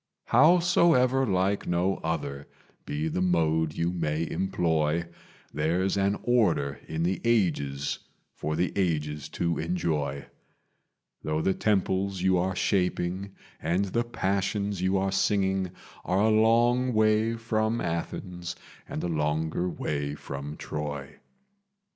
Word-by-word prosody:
"Howsoever 150 -3 +4
like 95 +1 +1
no 90 +3 +1
other 70 -4 -3 0.4
be 75 +2 -2
the 85 +3 -1
mode 80 -3 +2
you 85 +1 0
may 80 -2 -1
employ, 85 -3 0 0.5
There's 85 +6 +1
an 100 +1 +1
order 90 - +2
in 80 +1 -2
the 90 +2 0
ages 75 -12 0 0.3
for 75 0 -3
the 90 - 0
ages 75 -5 -1
to 85 +1 -1
enjoy; 75 -5 -1 1.0
Though 75 +1 -1
the 95 - +2
temples 95 -2 0
you 95 0 +4
are 95 +1 -1
shaping 95 +1 -1 0.3
and 90 +5 +1
the 115 +5 0
passions 100 -3 -1
you 95 +1 +2
are 95 0 0
singing 95 -1 +1 0.3
Are 95 +2 +1
a 110 +1 +4
long 120 +3 +3
way 110 +1 +3
from 115 0 0
Athens 85 +1 -4 0.3
and - - -4
a - - 0
longer 80 +2 0
way 70 -3 -3
from 70 +2 -7
Troy. 75 -2 -5
90 Hz, 125 wpm, -27 LUFS, 80-100 Hz, 1.0 s, Howsoever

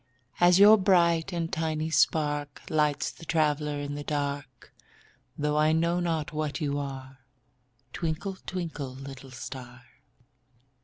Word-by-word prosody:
As 175 0 +6
your 210 +2 +8
bright 170 -2 +3
and 170 -2 -3
tiny 160 0 -1
spark 145 -1 +1
Lights 150 -2 +1
the - - -15
traveler 150 -2 0
in 145 0 -4
the 145 0 -5
dark, 145 -1 -4 0.6
Though 150 0 0
I 155 +1 +4
know 170 +2 +1
not 165 -3 -2
what 150 0 -2
you 145 -2 -1
are, 135 -1 -7 0.7
Twinkle, 175 +4 -3
twinkle, 160 -8 -4
little 135 0 -9
star. 125 0 -9
150 Hz, 125 wpm, -28 LUFS, 145-165 Hz, 0.7 s, your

